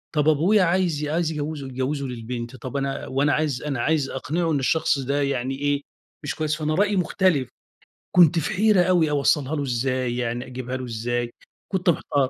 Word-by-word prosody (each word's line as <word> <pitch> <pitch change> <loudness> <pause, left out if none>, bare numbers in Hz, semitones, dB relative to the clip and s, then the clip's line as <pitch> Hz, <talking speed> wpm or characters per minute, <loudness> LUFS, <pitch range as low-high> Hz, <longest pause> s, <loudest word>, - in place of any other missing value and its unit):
طب 150 +1 +3
أبويا 180 +7 +4
عايز 170 -4 +1
عايز 160 +2 0
ي - - -5
يجوّزه 145 -2 -4
يجوّزه 130 +2 -2
للبنت 120 0 -6
طَب 130 +1 -5
أنا 135 0 -3
وأنا 140 +2 +1
عايز 150 -4 0
أنا 140 -5 -2
عايز 155 -2 +1
أقنعُه 165 +5 -1
إن 145 - +1
الشخص 140 +1 +1
ده 140 +2 -1
يعني 135 -1 -1
إيه، 145 0 0 0.4
مش 145 - -3
كويّس 155 -1 -1
فأنا 155 0 -1
رأيي 205 +2 +2
مُختلف 175 -7 +1 0.7
كنت 170 -1 +6
في 165 +7 -2
حيرة 205 -1 +4
أوي 175 -4 +3
أوصلّها 145 0 +2
له 145 - -1
إزاي 130 -1 -1
يعني 120 0 -2
أجيبها 130 0 -5
له 130 - -5
إزاي، 120 +1 -2 0.4
كنت 185 -1 +1
محتار. 140 -5 +1
145 Hz, 185 wpm, -24 LUFS, 130-160 Hz, 0.7 s, كنت